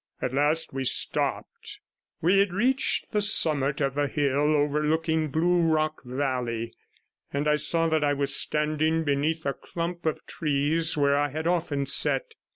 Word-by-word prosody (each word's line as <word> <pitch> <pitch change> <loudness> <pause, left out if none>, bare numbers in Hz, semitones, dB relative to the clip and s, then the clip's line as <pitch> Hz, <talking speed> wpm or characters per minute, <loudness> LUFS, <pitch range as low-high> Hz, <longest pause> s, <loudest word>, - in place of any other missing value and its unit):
At 125 - -3
last 150 +3 +1
we 135 0 -2
stopped. 130 - -2 0.4
We 185 +4 +4
had 200 -2 +2
reached 250 +7 0
the 210 - +1
summit 150 -8 +1
of 135 -1 0
the 145 0 0
hill 145 +1 +1
overlooking 155 +2 +1
Blue 175 +4 +2
Rock 155 -1 +1
Valley, 125 -3 -3 0.6
and 145 +1 -1
I 150 0 +3
saw 165 +2 0
that 160 -1 +1
I 145 0 +2
was 140 -1 -1
standing 155 +1 +1
beneath 155 +2 -1
a 140 - 0
clump 170 +1 -5
of 155 - -2
trees 155 +2 0
where 140 -1 +3
I 145 0 +1
had 155 +3 -5
often 160 -5 0
sat. 455 - +1
150 Hz, 160 wpm, -26 LUFS, 140-165 Hz, 0.6 s, We